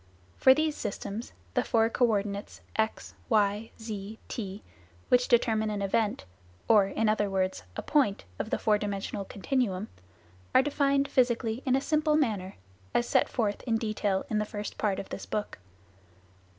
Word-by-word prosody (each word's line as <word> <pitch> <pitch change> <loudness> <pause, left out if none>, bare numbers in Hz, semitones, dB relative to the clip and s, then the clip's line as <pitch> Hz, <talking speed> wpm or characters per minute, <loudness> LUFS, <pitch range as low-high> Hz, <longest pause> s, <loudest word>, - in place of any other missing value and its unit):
For 260 - +6
these 310 0 +1
systems, 210 +1 -5 0.2
the - - +2
four 225 -1 +3
co 240 +2 +2
ordinates 200 -2 -2
x, 220 0 -1 0.2
y, 210 0 +2
z, 215 -1 -6
t, 200 -2 -5 0.5
which 250 0 +4
determine 220 -3 +3
an 205 -1 -2
event 205 - 0 0.4
or 210 -3 +6
in 220 +3 0
other 210 -1 +2
words, 190 -1 0 0.2
a - - -3
point 260 - +2
of - - -2
the - - +1
four 210 -1 +2
dimensional 200 -1 -3
continuum 210 -1 -1 0.7
are 260 - +7
defined 280 -1 +2
physically 240 -2 +1
in 255 - +4
a 270 - +1
simple 305 +1 +2
manner, 210 -11 0 0.4
as 240 - +2
set - - +3
forth 210 -4 -1
in 225 -1 +2
detail 215 -3 -1
in 215 - 0
the - - +1
first 210 0 -6
part 205 -3 +1
of - - -6
this - - -6
book. 210 - -3
215 Hz, 165 wpm, -29 LUFS, 205-240 Hz, 0.7 s, are